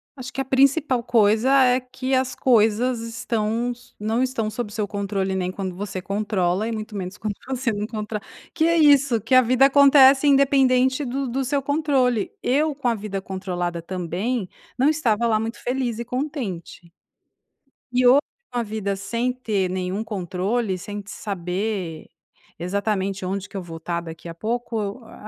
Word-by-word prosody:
acho 260 Hz, -1 st, -8 dB
que 270 Hz, -, -2 dB
a -, -, -3 dB
principal 270 Hz, -1 st, +2 dB
coisa 220 Hz, +2 st, +3 dB
é 250 Hz, 0 st, +4 dB
que 255 Hz, +1 st, -5 dB
as 260 Hz, 0 st, 0 dB
coisas 235 Hz, 0 st, +3 dB
estão, 230 Hz, 0 st, -2 dB
s 240 Hz, 0 st, -13 dB
não 225 Hz, +4 st, 0 dB
estão 235 Hz, -4 st, -1 dB
sob 215 Hz, -1 st, -5 dB
seu 210 Hz, -3 st, -2 dB
controle 195 Hz, -1 st, -2 dB
nem 185 Hz, -1 st, -1 dB
quando 185 Hz, -2 st, -5 dB
você 190 Hz, -1 st, -5 dB
controla 195 Hz, 0 st, -1 dB
e -, -, -2 dB
muito 215 Hz, 0 st, -5 dB
menos 190 Hz, +1 st, -5 dB
quando 210 Hz, -2 st, -3 dB
você 260 Hz, -2 st, -1 dB
não 205 Hz, +1 st, -3 dB
controla 215 Hz, -1 st, -4 dB, 0.3 s
que 320 Hz, -1 st, +2 dB
é 335 Hz, 0 st, +3 dB
isso, 280 Hz, -6 st, +5 dB
que 230 Hz, +5 st, +2 dB
a 255 Hz, -, +9 dB
vida 255 Hz, +2 st, +4 dB
acontece, 280 Hz, 0 st, +6 dB
independente 265 Hz, -1 st, +4 dB
do 270 Hz, +2 st, -2 dB
do 265 Hz, +3 st, -1 dB
seu 280 Hz, +1 st, 0 dB
controle. 270 Hz, -6 st, +1 dB
Eu 295 Hz, +4 st, +2 dB
com 270 Hz, -3 st, -3 dB
a 235 Hz, -, +2 dB
vida 200 Hz, -2 st, -5 dB
controlada 180 Hz, -3 st, -4 dB
também, 185 Hz, +6 st, -3 dB, 0.3 s
não 265 Hz, +3 st, +3 dB
estava 235 Hz, -7 st, +1 dB
lá 220 Hz, -2 st, +2 dB
muito 225 Hz, +1 st, -4 dB
feliz 245 Hz, -2 st, -1 dB
e 235 Hz, -, -4 dB
contente. 245 Hz, -, -5 dB, 1.0 s
E 250 Hz, 0 st, +3 dB
hoje 260 Hz, +3 st, +7 dB, 0.3 s
com 245 Hz, -, -2 dB
a 235 Hz, -, +1 dB
vida 210 Hz, -2 st, -3 dB
sem 235 Hz, +5 st, -1 dB
ter 215 Hz, -7 st, -1 dB
nenhum 185 Hz, +3 st, -3 dB
controle, 195 Hz, +1 st, -2 dB
sem 205 Hz, +3 st, -6 dB
saber 190 Hz, -3 st, -4 dB, 0.5 s
exatamente 195 Hz, +1 st, -2 dB
onde 195 Hz, +1 st, -3 dB
que 200 Hz, -, -9 dB
eu 190 Hz, -, -3 dB
vou 165 Hz, -2 st, -9 dB
tá 170 Hz, +1 st, -2 dB
daqui 165 Hz, 0 st, -9 dB
a 165 Hz, -, -7 dB
pouco, 225 Hz, +2 st, -3 dB
a 215 Hz, -, -13 dB
225 Hz, 175 wpm, -23 LUFS, 195-255 Hz, 1.0 s, a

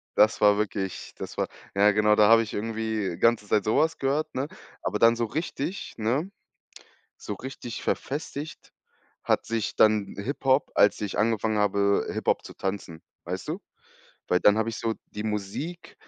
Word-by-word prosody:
das 105 Hz, +1 st, +4 dB
war 105 Hz, -1 st, +6 dB
wirklich, 100 Hz, -3 st, -3 dB
das -, -, -7 dB
war -, -, 0 dB, 0.3 s
ja, 100 Hz, +1 st, +5 dB
genau, 105 Hz, +1 st, +4 dB
da 105 Hz, -, +6 dB
habe 115 Hz, 0 st, +7 dB
ich 110 Hz, -, -5 dB
irgendwie 110 Hz, -4 st, -2 dB
ganze 115 Hz, -2 st, +3 dB
Zeit 105 Hz, 0 st, +2 dB
so 110 Hz, -, +1 dB
was 160 Hz, +1 st, +2 dB
gehört, 140 Hz, +3 st, 0 dB
ne? 130 Hz, +2 st, -2 dB, 0.3 s
Aber -, -, -1 dB
dann 115 Hz, 0 st, +5 dB
so 115 Hz, -, 0 dB
richtig, 160 Hz, -, -4 dB
ne, 130 Hz, -, -1 dB, 0.9 s
so 105 Hz, -, -5 dB
richtig 120 Hz, 0 st, -7 dB
verfestigt 145 Hz, +1 st, -4 dB, 0.5 s
hat -, -, +1 dB
sich 115 Hz, -2 st, -2 dB
dann 105 Hz, -2 st, +3 dB
Hip-Hop, 130 Hz, +5 st, +1 dB
als 100 Hz, -, +4 dB
ich 105 Hz, -, -3 dB
angefangen 110 Hz, 0 st, +1 dB
habe, 100 Hz, -1 st, +2 dB
Hip-Hop -, -, 0 dB
zu -, -, -11 dB
tanzen, 95 Hz, -4 st, -5 dB, 0.2 s
weißt -, -, -5 dB
du? -, -, -3 dB, 0.7 s
Weil 90 Hz, -, +3 dB
dann 105 Hz, +1 st, +5 dB
hab 110 Hz, -, +1 dB
ich 115 Hz, -, -3 dB
so 115 Hz, -1 st, -1 dB, 0.2 s
die 105 Hz, -, -5 dB
Musik, 110 Hz, -, -4 dB
110 Hz, 170 wpm, -26 LUFS, 105-125 Hz, 0.9 s, habe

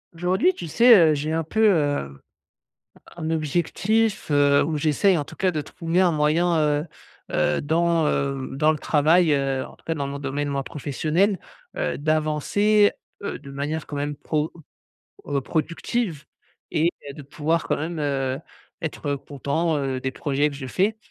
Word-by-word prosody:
Aujourd'hui 185 Hz, -, +2 dB
tu 170 Hz, -, -7 dB
sais, 235 Hz, +9 st, +7 dB, 0.2 s
heu, -, -, +3 dB
j'ai 150 Hz, +2 st, -2 dB
un 165 Hz, 0 st, 0 dB
peu, 220 Hz, +8 st, +2 dB
heu, 145 Hz, -, 0 dB, 1.0 s
un 160 Hz, -2 st, -3 dB
objectif, 175 Hz, +7 st, 0 dB
heu, 145 Hz, -1 st, +4 dB
où 155 Hz, 0 st, -1 dB
j'essaye 160 Hz, +5 st, +3 dB
en 145 Hz, -, -2 dB
tout -, -, -13 dB
cas 190 Hz, -, +1 dB
de 155 Hz, -3 st, -2 dB
trouver 165 Hz, +4 st, -1 dB
un 185 Hz, -2 st, +4 dB
moyen, 160 Hz, +2 st, +2 dB
heu 150 Hz, 0 st, +1 dB, 0.4 s
heu, 75 Hz, -, +1 dB
dans, 165 Hz, +1 st, +2 dB
heu, 135 Hz, -2 st, -1 dB
dans 150 Hz, +3 st, +3 dB
le 155 Hz, -, -4 dB
travail, 160 Hz, +3 st, +3 dB
heu, 135 Hz, -1 st, 0 dB
en -, -, -15 dB
tout -, -, -28 dB
cas 165 Hz, -, -1 dB
dans 140 Hz, -3 st, -3 dB
mon 140 Hz, 0 st, -5 dB
domaine, 145 Hz, +1 st, -3 dB
moi, 140 Hz, -1 st, -1 dB
professionnel. 160 Hz, +9 st, 0 dB, 0.4 s
Heu, -, -, -2 dB
d'avancer, 155 Hz, +8 st, +2 dB, 0.3 s
heu, 200 Hz, -, -4 dB
de 140 Hz, -, -12 dB
manière 145 Hz, +3 st, -3 dB
quand 145 Hz, -, -6 dB
même 145 Hz, +1 st, -3 dB
pro 155 Hz, +1 st, -2 dB, 0.7 s
heu, 140 Hz, -1 st, 0 dB
productive. 165 Hz, -, -2 dB, 0.5 s
Et 160 Hz, +2 st, +2 dB, 0.2 s
bah, 140 Hz, -, -6 dB
de 150 Hz, -, -9 dB
pouvoir 155 Hz, +4 st, -1 dB
quand -, -, 0 dB
même, 160 Hz, +2 st, -4 dB
heu, 135 Hz, -2 st, -1 dB, 0.4 s
être 150 Hz, -2 st, -3 dB
content, 145 Hz, +4 st, -2 dB
heu, 135 Hz, -2 st, -2 dB
des 130 Hz, -, -2 dB
projets 145 Hz, +2 st, 0 dB
que 140 Hz, -, -8 dB
je 135 Hz, -1 st, -6 dB
fais 195 Hz, -, 0 dB
155 Hz, 175 wpm, -24 LUFS, 145-170 Hz, 1.0 s, sais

